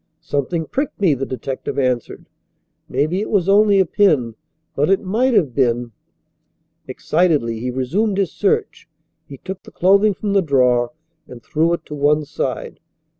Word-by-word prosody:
"Something 155 +4 -2
pricked 275 - -3
me," 185 -7 +3
the 135 0 -3
detective 130 +1 -5
answered. 125 -3 -2 0.6
"Maybe 155 +9 0
it - - -4
was 195 -4 +1
only 200 0 +4
a 190 - +4
pin, 150 - +2 0.4
but 145 +4 +1
it 195 +1 +2
might 235 +6 +1
have 145 - +2
been 120 -2 0 0.5
" - - -48
Excitedly 150 -10 0
he 125 +2 -3
resumed 180 - -1
his 195 -5 0
search. 195 -4 -1 0.4
He 140 - -10
took 190 +6 -8
the - - -14
clothing 200 +3 +3
from 205 0 -3
the 200 - +4
drawer 125 -6 +2 0.4
and 120 -2 -12
threw 160 +2 0
it 170 - -4
to 150 - -9
one 150 +1 +1
side. 145 - -4
155 Hz, 165 wpm, -19 LUFS, 130-195 Hz, 0.6 s, only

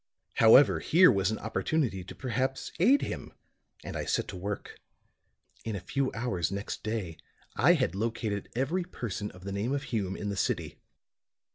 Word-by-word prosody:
"However, 115 +5 +7
here 180 +3 +6
was 95 -1 +1
an 110 - -1
opportunity 110 - -1
to 90 - -10
perhaps 130 +1 -2
aid 265 +11 +5
him; - - -5 0.5
and - - -6
I - - -3
set - - 0
to 95 - -6
work. 100 +3 -5 0.8
In 110 -2 -3
a - - -3
few 135 +7 -1
hours 95 -8 -1
next 100 +1 -4
day 105 -7 -3 0.4
I - - +5
had - - +1
located 110 -1 -2
every 150 +9 0
person 110 - -5
of 90 0 -14
the 100 - -5
name 105 +7 -1
of 140 - -3
Hume 100 -7 -2
in 105 - -3
the 100 - -2
city. 95 - -2
110 Hz, 170 wpm, -29 LUFS, 100-130 Hz, 0.8 s, However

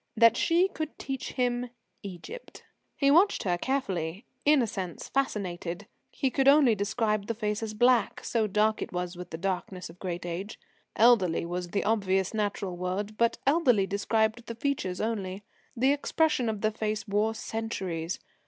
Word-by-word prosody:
that 230 0 +7
she 340 +8 +3
could 315 -4 -5
teach 270 -2 -5
him 245 -1 0 0.3
"Egypt." 200 - -9 0.3
He 275 -1 +4
watched 360 +7 +4
her 180 -3 +1
carefully, 190 -5 -2 0.2
in 295 -3 +5
a - - +2
sense 185 -5 -5
fascinated. 190 -8 -2 0.3
He 265 - -1
could 270 0 +1
only 275 -4 +7
describe 210 0 0
the 230 - -2
face 210 -1 -2
as 215 -1 -4
black, 240 -1 +3
so 225 -2 0
dark 215 +2 +1
it - - -4
was 180 0 -3
with 180 0 -8
the 160 - -5
darkness 185 0 -3
of 175 - -19
great 175 -2 -4
age. 180 +5 -5 0.4
Elderly 215 -9 +4
was 175 +1 -3
the 200 - -1
obvious, 195 -3 +1
natural 205 -3 -2
word; 185 +4 -3
but 235 +1 +2
elderly 265 - +4
described 220 +4 0
the 230 - -5
features 225 -8 -2
only. 205 -3 -3 0.3
The 265 +4 +4
expression 290 -4 +1
of 215 -2 -3
the 215 - +2
face 215 0 -3
wore 210 +2 +1
centuries. 190 -8 -3
215 Hz, 165 wpm, -28 LUFS, 185-245 Hz, 0.4 s, that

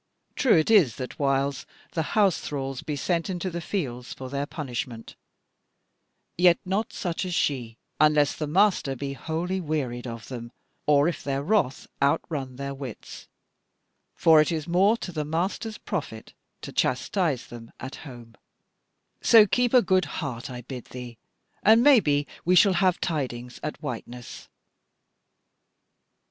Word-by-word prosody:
True 250 -10 +4
it 160 +7 +2
is 170 - +5
that 130 -1 -7
whiles 135 -1 0 0.2
the 165 - -1 0.2
house 200 -5 +4
thralls 135 -2 -4
be 150 - -4
sent 170 +5 -1
into 185 0 -3
the 170 0 -4
fields 125 -10 -4
for 130 -1 -8
their 140 +1 -2
punishment; 125 -6 -6 1.2
yet 175 -1 +6
not 195 +4 -1
such 175 -1 -3
as 180 -2 -3
she, 120 -8 -1 0.2
unless 150 -1 +4
the 155 - -3
master 175 -5 +2
be 140 +2 -4
wholly 170 +6 -3
wearied 130 -7 -3
of 115 -1 -7
them, 120 -2 -7 0.4
or 145 0 +5
if 170 - -3
their 140 0 -2
wrath 160 -7 +1 0.2
outrun 140 -2 0
their 140 +1 -5
wits; 135 -5 -9 0.9
for 160 -2 +6
it 155 - 0
is 160 -1 -3
more 195 +6 +4
to 185 - -6
the 155 -3 -2
master's 185 +8 -2
profit 140 - -5 0.3
to - - -6
chastise 135 - 0
them 115 -1 -11
at 130 +2 -7
home; 120 -5 -11 0.9
so 225 -2 +7
keep 245 +4 +1
a 250 -2 +6
good 185 -1 +2
heart 135 -6 -5
I 125 -1 -7
bid 125 0 -8
thee, 125 -2 -9 0.4
and 225 +3 +6
maybe 155 - +5 0.2
we 180 +2 +3
shall 190 +2 +6
have 185 -2 +3
tidings 125 -6 -3
at 150 - -6
Whiteness." 120 0 -7
150 Hz, 150 wpm, -26 LUFS, 130-180 Hz, 1.2 s, so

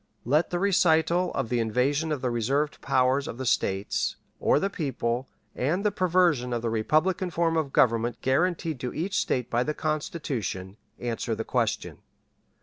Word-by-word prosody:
Let 150 +7 +2
the 175 - -1
recital 175 -2 +3
of 115 - -1
the 120 - +1
invasion 135 +8 +1
of 145 -4 -2
the 125 - 0
reserved 135 +6 0
powers 130 +2 +2
of - - -6
the 130 - -4
States, 95 -4 0 0.2
or - - +3
the 195 - +1
people, 130 -8 -2 0.3
and 170 +10 0
the 210 - +3
perversion 175 -10 +2
of 120 -1 -2
the 115 - 0
republican 155 - +1
form 165 -1 +1
of 155 -4 0
government 115 -2 +2
guaranteed 160 +1 +1
to 125 - -4
each 190 +5 -2
State 125 -2 -1
by 120 - +2
the 150 +4 -1
Constitution, 130 - -3 0.2
answer 120 -1 -2
the - - -3
question. - - -1
140 Hz, 165 wpm, -27 LUFS, 120-165 Hz, 0.3 s, recital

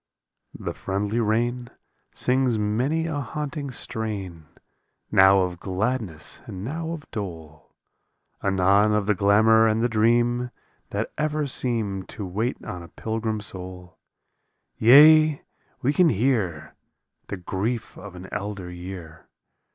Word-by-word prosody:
47 - - -12
The - - -21
friendly 100 +4 -1
rain 120 +2 0 0.5
Sings 125 -2 +2
many 125 +10 0
a 160 -3 -2
haunting 145 0 -4
strain, 100 - -4 0.6
Now 95 0 +6
of 90 -2 -2
gladness 95 -4 -2
and 95 0 -7
now 160 +7 -4
of 165 -2 -6
dole, 80 -8 -8 0.7
Anon 100 +2 +3
of 105 -1 +1
the 105 - +3
glamor 110 +3 +5
and 110 +1 +1
the - - +4
dream 120 +2 +2 0.4
That - - -3
ever 150 0 0
seem 110 -8 -1
To 105 - -7
wait 110 +8 -2
on 90 - -6
a 85 - -10
pilgrim 110 +1 -3
soul; 90 -3 -8 0.8
Yea, 150 +5 +7 0.4
we 140 +4 +2
can 175 +1 +5
hear 105 - 0 0.5
The 100 - -5
grief 105 +6 -3
of 100 -2 -10
an 90 +1 -9
elder 100 -3 -5
year. 90 -3 -9
110 Hz, 130 wpm, -24 LUFS, 95-125 Hz, 0.8 s, Yea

